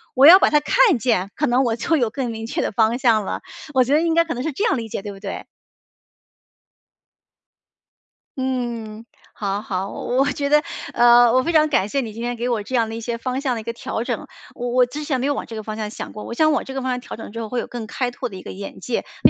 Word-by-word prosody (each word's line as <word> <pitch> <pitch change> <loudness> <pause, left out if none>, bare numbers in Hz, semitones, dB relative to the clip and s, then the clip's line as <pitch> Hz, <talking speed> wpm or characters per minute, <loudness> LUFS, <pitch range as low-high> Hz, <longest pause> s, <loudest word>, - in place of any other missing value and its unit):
我 265 +2 +6
要 355 +5 +11
把 - - +4
它 300 - +4
看 315 - +4
见， 225 -6 0
可 - - 0
能 245 +2 +3
我 235 -3 +1
就 320 +7 +1
有 240 -5 +1
更 250 0 -3
明 225 0 -6
确 - - -2
的 - - -1
方 220 +2 +2
向 230 -5 +3
了。 - - -3 0.3
我 260 - +6
觉 260 +3 0
得 305 - +4
应 330 -1 +1
该 335 0 +4
可 330 - -3
能 245 - -4
是 315 +4 -2
这 340 - -2
样 455 - +3
理 225 -2 -5
解， 195 - -5
对 205 - -5
不 195 - -11
对？ 195 -1 -6 2.9
嗯， 235 -4 -3 0.3
好 200 0 -2
好， 195 -2 -3
我 245 - -3
我 - - -1
觉 280 -1 -2
得， 300 - +6 0.4
呃， 240 0 +7
我 255 +2 +3
非 335 - -1
常 310 -1 +4
感 205 -9 +2
谢 275 +5 0
你 225 -4 -6
今 230 +2 -6
天 245 0 -2
给 240 +1 -2
我 225 -3 0
这 230 - -9
样 230 -3 +2
的 225 - -5
一 230 - -5
些 235 +1 -3
方 255 +2 -2
向 265 -3 0
的 225 - -4
一 - - -12
个 230 - -4
调 230 -1 -4
整。 - - -3 0.3
我 245 0 -3
我 250 0 +3
之 300 +4 -6
前 285 -3 -1
没 260 - 0
有 285 - +1
往 - - -4
这 225 - -9
个 220 - -4
方 215 0 -6
向 215 -1 -4
想 - - -7
过， 210 - -8
我 - - -6
想 310 +5 +3
往 290 - 0
这 265 - -7
个 270 - -3
方 260 - -2
向 250 - -1
调 - - -8
整 225 - -9
之 230 - -6
后 225 - -4
会 250 - -1
有 - - -4
更 240 -2 -6
开 250 +3 -2
拓 245 - -5
的 195 - -10
一 185 - -8
个 - - -8
眼 195 +1 -8
界。 245 - -2 0.2
非 - - +9
240 Hz, 305 characters per minute, -21 LUFS, 220-265 Hz, 2.9 s, 要